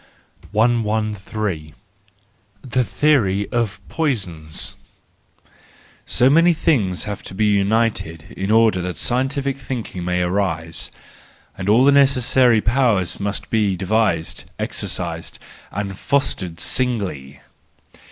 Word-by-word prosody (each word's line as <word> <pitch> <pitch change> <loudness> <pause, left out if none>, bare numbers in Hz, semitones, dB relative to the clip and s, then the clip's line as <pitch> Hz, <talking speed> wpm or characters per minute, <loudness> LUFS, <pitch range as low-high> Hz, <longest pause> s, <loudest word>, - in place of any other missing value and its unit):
113. 105 -6 -1 0.9
The 130 0 0
Theory 105 -8 +2
of 115 -4 -1
Poisons 95 - -2 1.3
.—So 125 - +3
many 165 +5 +5
things 110 - +1
have 105 -2 -5
to 95 - -9
be 105 +2 +1
united 100 -6 0
in 95 +1 -3
order 110 -4 +4
that 90 0 -4
scientific 135 +2 0
thinking 120 -9 -5
may 90 0 0
arise, 90 -4 -1 0.7
and 95 +1 -3
all 120 +5 +5
the 140 - +6
necessary 130 -4 +4
powers 110 -6 +1
must 100 0 -2
have - - -19
been 105 -4 +1
devised, 95 -3 0
exercised, - - -4 0.3
and 100 -1 -4
fostered 95 -9 -1
singly! 95 - -2
105 Hz, 105 wpm, -20 LUFS, 95-125 Hz, 1.3 s, the